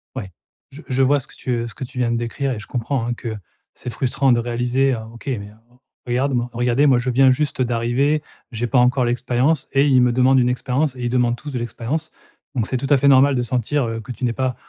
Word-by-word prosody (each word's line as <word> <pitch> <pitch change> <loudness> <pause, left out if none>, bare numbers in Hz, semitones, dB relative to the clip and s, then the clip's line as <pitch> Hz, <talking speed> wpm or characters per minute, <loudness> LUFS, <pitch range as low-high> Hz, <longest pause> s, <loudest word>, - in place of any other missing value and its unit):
Ouais. 100 -7 -6 0.4
Je 140 +3 -11
je 130 -1 0
vois 140 +2 +4
ce 130 - -8
que - - -16
tu, 130 - -5
heu, 120 -1 -1
ce 115 - -9
que - - -6
tu 125 - -9
viens 120 -1 +1
de 120 - 0
décrire 120 +4 -2
et 120 - -3
je 105 - -10
comprends, 125 0 -2
hein, 120 - -1
que 115 -2 -5 0.4
c'est - - -8
frustrant 130 +3 +1
de 120 - +3
réaliser: 120 +3 0
«Heu 120 - -3
OK, 120 +5 -14
mais, 105 -7 -3
heu, - - -17 0.5
regarde 130 +3 0
moi 120 -1 -1
regardez 120 +4 +2
moi 130 -3 +4
je 125 +1 -2
viens 130 +1 +5
juste 140 0 -1
d'arriver, 125 +5 +1 0.3
j'ai 120 +1 -2
pas 125 +1 +3
encore 125 +1 +3
l'expérience 125 +4 0
et 140 +1 +4
ils 130 -3 +5
me 125 0 +3
demandent 130 +2 +4
une 125 0 +2
expérience 130 +3 -1
et 125 - -7
ils - - 0
demandent 120 -1 +1
tous 150 +2 -8
de 130 - -3
l'expérience.». 120 +7 -4 0.4
Donc 115 -3 0
c'est 130 - -1
tout 135 - -3
à 145 - +7
fait 140 +2 +2
normal 140 0 +6
de 125 - +1
sentir, 125 +3 -1
heu, 115 0 -4
que 120 - -9
tu 125 +1 -4
n'es 120 - 0
pas, 130 0 -1
125 Hz, 260 wpm, -21 LUFS, 120-135 Hz, 0.5 s, à